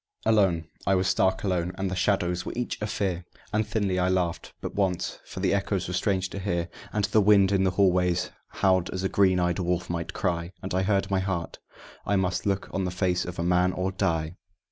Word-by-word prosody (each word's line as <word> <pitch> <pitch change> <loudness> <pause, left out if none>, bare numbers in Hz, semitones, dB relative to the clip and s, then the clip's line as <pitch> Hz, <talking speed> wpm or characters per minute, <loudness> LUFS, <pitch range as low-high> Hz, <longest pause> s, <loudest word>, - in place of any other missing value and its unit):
Alone, 95 -7 +3 0.2
I 95 - +4
was 95 0 +1
stark 95 0 +2
alone, 90 -2 0
and 95 -1 -2
the - - -2
shadows 90 -2 +1
were - - -5
each 120 -2 -3
a 105 - -1
fear; 95 -4 -2 0.3
And 105 0 +1
thinly 100 -4 0
I 90 0 +2
laughed, 90 -3 -1
but - - -5
once, 95 -3 -1
for 95 - -7
the 95 -1 +2
echoes 100 -1 0
were 90 - -4
strange 95 -1 0
to 100 - -5
hear; 85 -3 -1 0.2
And 105 -1 +1
the 105 +1 +3
wind 100 -1 +5
in 95 -1 +3
the - - +4
hallways 90 -2 +2 0.2
howled 95 -2 +1
as 95 0 -4
a 95 - +1
green 95 -2 +3
eyed 90 0 +1
wolf 90 0 -1
might 85 -1 -3
cry, 85 -2 -2
And 95 - -4
I 95 - +2
heard 100 0 +1
my 95 - +2
heart: 95 -3 -3 0.4
I 100 - 0
must 95 0 0
look 100 -1 0
on 95 - 0
the 90 - -1
face 90 -1 0
of 90 - -6
a 85 - -1
man, 90 +1 +3
or 95 +1 -1
die! 85 -2 -1
95 Hz, 225 wpm, -27 LUFS, 90-100 Hz, 0.4 s, wind